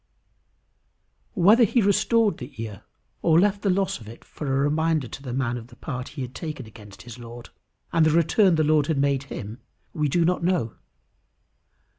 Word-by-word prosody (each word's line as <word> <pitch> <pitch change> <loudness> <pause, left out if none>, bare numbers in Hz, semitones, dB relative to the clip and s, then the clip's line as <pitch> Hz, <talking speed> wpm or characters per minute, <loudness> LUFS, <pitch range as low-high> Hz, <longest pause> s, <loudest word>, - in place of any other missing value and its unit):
Whether 210 +6 +6
he 235 +3 +3
restored 215 +1 +2
the 125 -1 -10
ear, 110 -3 -7 0.4
or 165 0 +4
left 200 +1 +2
the 200 - 0
loss 190 -3 0
of 110 - -13
it 115 - -13
for 150 - -7
a 135 - +1
reminder 155 0 +1
to 135 - -9
the 130 -3 -6
man 125 -1 -1
of 115 -1 -9
the 120 - -16
part 130 -1 -6
he 135 - -2
had 125 0 -8
taken 150 -6 -6
against 105 -3 -13
his 120 0 -10
Lord, 120 0 -10 0.4
and 165 -1 +4
the 155 - +4
return 170 +4 +3
the 155 - +2
Lord 150 -1 +3
had 160 - 0
made 140 -1 +1
him, 105 +4 -7 0.3
we 150 -2 0
do 170 +4 +2
not 180 0 0
know. 170 -11 0
150 Hz, 190 wpm, -24 LUFS, 120-175 Hz, 0.4 s, Whether